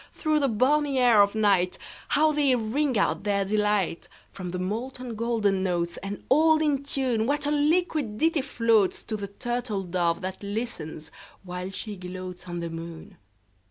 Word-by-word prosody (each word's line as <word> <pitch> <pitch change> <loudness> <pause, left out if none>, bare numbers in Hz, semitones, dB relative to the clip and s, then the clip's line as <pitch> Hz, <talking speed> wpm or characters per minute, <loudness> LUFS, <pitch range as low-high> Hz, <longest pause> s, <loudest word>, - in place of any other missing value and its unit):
Through 310 -1 +1
the 280 - +2
balmy 275 +4 +2
air 240 -5 +6
of 200 0 +3
nightHow 210 - +1
they 285 -3 +3
ring 250 +3 0
out 200 - +1
their 200 -1 +1
delight! 210 -4 0 0.2
From 185 -2 -6
the 180 - -4
molten 235 +6 -4
golden 215 -4 +1
notes, 175 -2 -1
And 195 +1 -6
all 315 +3 +5
in 290 -3 +1
tune, 255 -5 0
What 290 +1 0
a 290 - +1
liquid 300 -6 +1
ditty 320 +1 +2
floatsTo 230 -5 +1
the 200 - -4
turtle 235 -1 -3
dove 175 0 0
that 190 0 -5
listens, 200 -8 -5 0.3
while 180 0 -5
she 205 +2 -5
gloatsOn 180 -1 -6
the 170 -1 -4
moon! 165 0 -8
215 Hz, 155 wpm, -26 LUFS, 185-270 Hz, 0.3 s, air